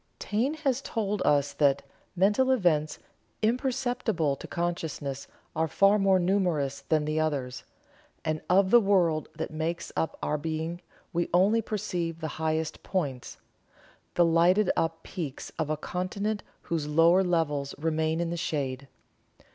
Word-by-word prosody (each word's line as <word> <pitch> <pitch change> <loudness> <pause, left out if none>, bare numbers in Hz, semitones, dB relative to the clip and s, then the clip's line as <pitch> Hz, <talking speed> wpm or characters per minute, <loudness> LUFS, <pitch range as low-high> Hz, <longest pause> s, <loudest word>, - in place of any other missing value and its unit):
Taine 245 +9 -1
has 275 -4 0
told 210 -6 -2
us 145 -1 +3
that: 140 -1 +2 0.3
"Mental 205 +8 +3
events 165 -11 +2 0.5
imperceptible 245 - 0
to - - -10
consciousness 160 -5 -3 0.3
are 160 +1 +1
far 200 +5 +4
more 195 -1 +4
numerous 175 -7 0
than 155 -1 +1
the 155 +1 0
others, 135 -5 -2 0.6
and 155 -1 -1
of 190 +1 +4
the 240 - +9
world 180 -7 +2
that - - -4
makes 160 +2 -3
up 160 - -1
our 150 - 0
being 160 +3 -3 0.3
we 170 0 0
only 205 +6 +4
perceive 175 -6 -3
the 160 - -3
highest 160 0 -1
points 145 -10 -3 0.8
the 175 - +5
lighted 175 +4 +4
up 165 0 -1
peaks 160 -8 -6
of 155 -2 -1
a 155 - 0
continent 200 +6 -3 0.2
whose 160 -3 -2
lower 165 +5 +5
levels 150 -6 0
remain 160 +1 0
in 170 -1 -1
the 170 - -2
shade. 140 -4 -3
165 Hz, 140 wpm, -28 LUFS, 155-195 Hz, 0.8 s, the